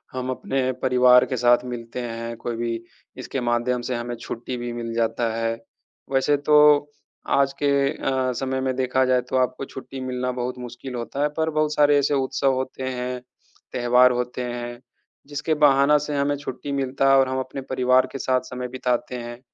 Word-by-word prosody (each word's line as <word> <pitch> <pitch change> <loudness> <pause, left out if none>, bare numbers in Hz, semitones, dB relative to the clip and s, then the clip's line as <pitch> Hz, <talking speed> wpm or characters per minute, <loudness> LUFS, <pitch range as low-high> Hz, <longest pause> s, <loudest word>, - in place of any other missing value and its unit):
हम 130 0 -3
अपने 130 0 -1
परिवार 125 -1 +6
के 130 - -2
साथ 120 +1 +4
मिलते 120 0 -6
हैं, 115 -1 -5
कोई 115 0 -4
भी 115 -1 -2 0.4
इसके 130 +1 -4
माध्यम 120 +1 0
से 125 - -3
हमें 120 0 -4
छुट्टी 120 +2 -6
भी 120 0 -4
मिल 115 -1 -5
जाता 115 0 0
है। 115 0 -1 0.6
वैसे 135 +2 +3
तो 150 +1 +3 0.8
आज 140 0 +3
के 145 - +3 0.2
अ, 130 -4 -1
समय 130 +1 -2
में 130 0 -1
देखा 130 0 +1
जाए 130 -1 +3
तो - - 0
आपको 130 +1 0
छुट्टी 135 0 -9
मिलना 125 0 -2
बहुत 125 0 -4
मुश्किल 125 +1 -8
होता 120 +4 -4
है, 150 - +3
पर 160 +2 -1
बहुत 155 -1 0
सारे 145 -1 +5
ऐसे 145 +1 +1
उत्सव 135 0 +1
होते 130 0 -4
हैं, 125 0 -4 0.5
त्योहार 125 +1 +4
होते 125 +1 -3
हैं, 120 0 -5 0.5
जिसके 145 +2 -1
बहाना 140 +1 +5
से 150 0 -3
हमें 140 +1 +1
छुट्टी 140 0 -6
मिलता 135 0 0
है 135 - +7
और 135 - +3
हम 130 0 -2
अपने 130 +1 -5
परिवार 130 0 +3
के 135 - -5
साथ 130 -1 +1
समय 125 0 -4
बिताते 125 -1 -2
हैं। 120 0 -7
125 Hz, 185 wpm, -23 LUFS, 120-135 Hz, 0.8 s, है